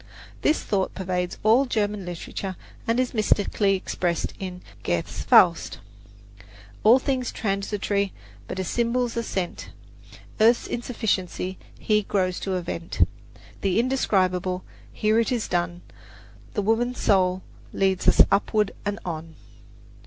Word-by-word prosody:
This 305 - +2
thought 195 -2 -1
pervades 180 -1 -2
all 235 +6 +5
German 210 -4 -1
literature 180 +2 -5 0.3
and 230 +2 +2
is 255 -1 0
mystically 205 -2 +2
expressed 175 -2 -2
in 180 -1 -6 0.2
Goethe's 85 -1 -2
"Faust": - - +5 1.1
All 225 +4 +8
things 260 -2 -1
transitory 200 -1 -1 0.4
But - - -5
as 185 - -2
symbols 240 +2 0
are 235 - 0
sent. 190 -6 -4 0.7
Earth's 230 +2 +5
insufficiency 195 -6 -2 0.2
Here 210 -1 +2
grows 185 -3 0
to 190 -1 -2
event. 170 - -1 0.5
The 195 +1 +2
indescribable 185 -7 +1 0.3
Here 215 +1 +2
it 230 - +1
is 240 -3 -1
done. 175 0 -1 0.7
The 205 - 0
Woman 235 +4 +1
Soul 185 -4 +2 0.3
leads 190 -1 +1
us - - +8
upward 210 +1 +2
and 205 0 -2
on! 160 -2 -5
200 Hz, 125 wpm, -25 LUFS, 185-225 Hz, 1.1 s, All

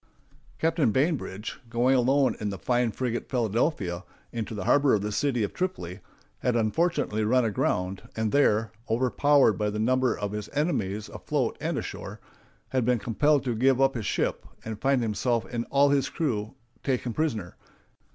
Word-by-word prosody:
] 140 0 -30
Captain 160 -5 +2
Bainbridge, 130 - -1
going 120 +3 +2
alone 135 +2 +3
in 105 - -2
the 100 - -4
fine 120 0 +1
frigate 120 +2 -3
Philadelphia 110 - 0 0.3
into 115 -1 -4
the 105 - -4
harbor 145 -3 +4
of 100 - -1
the 105 - -2
city 125 0 0
of 100 - -3
Tripoli, 105 - -3 0.4
had 125 - 0
unfortunately 115 -1 +1
run 125 +3 +3
aground, 95 -3 -1
and 110 -1 -1
there, 115 -6 +3 0.2
overpowered 130 0 +3
by 105 0 +1
the 105 - -4
number 130 +3 +2
of 105 -1 -3
his 105 0 -5
enemies 110 - -1
afloat - - -2
and - - -1
ashore, - - -6 0.5
had 130 -2 +1
been 125 +1 +2
compelled 145 +6 +2
to 125 -3 -1
give 130 +3 +3
up 135 0 +4
his 115 -4 -4
ship, - - -1 0.2
and 110 -1 -6
find 135 -2 +2
himself 115 +2 0
and 120 0 -2
all 140 +1 +4
his 140 -2 +2
crew 110 -9 -2 0.3
taken 125 -3 -1
prisoners. 110 - -2
120 Hz, 170 wpm, -27 LUFS, 105-135 Hz, 0.5 s, harbor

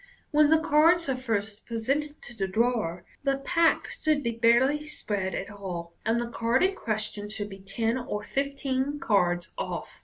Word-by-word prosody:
When 300 0 +5
the 320 - +6
cards 320 +2 +4
are 265 - +1
first 220 -4 -3
presented 275 +6 -2
to 240 - -10
the 195 -3 -1
drawer, 215 -5 0 0.2
the 275 -1 +1
pack 330 +4 +2
should 305 -2 0
be 235 - 0
barely 240 +6 +3
spread 195 - -3
at - - -4
all, 180 -4 -6
and 230 +1 +1
the 235 0 -3
card 235 +6 +1
in 380 +1 +3
question 215 - -3
should 210 -1 -2
be 195 - -9
ten 225 +5 -1
or 210 -4 -4
fifteen 275 +1 -1
cards 175 -7 +1
off. - - -5
235 Hz, 175 wpm, -27 LUFS, 205-280 Hz, 0.2 s, the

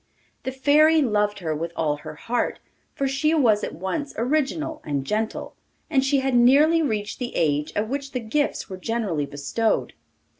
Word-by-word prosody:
The 260 - -1
Fairy 300 +4 +4
loved 210 -3 +1
her 160 -2 -1
with 165 +2 -4
all 150 -2 0
her 150 - -9
heart, 240 +10 -2 0.4
for 275 - 0
she 275 +4 +1
was 225 -9 +3
at - - -4
once 235 - -4
original 305 +5 -1
and 140 -3 -2
gentle, 215 +7 -2 0.4
and 265 -3 +3
she 270 0 +2
had 265 -1 0
nearly 285 +7 +5
reached 215 -7 -2
the 245 -1 -4
age 150 -1 +1
at 210 +1 0
which 275 +2 -4
the 250 - -2
gifts 280 +6 -1
were 190 -3 -7
generally 185 -8 -2
bestowed. 145 +11 -1
235 Hz, 175 wpm, -24 LUFS, 190-280 Hz, 0.4 s, nearly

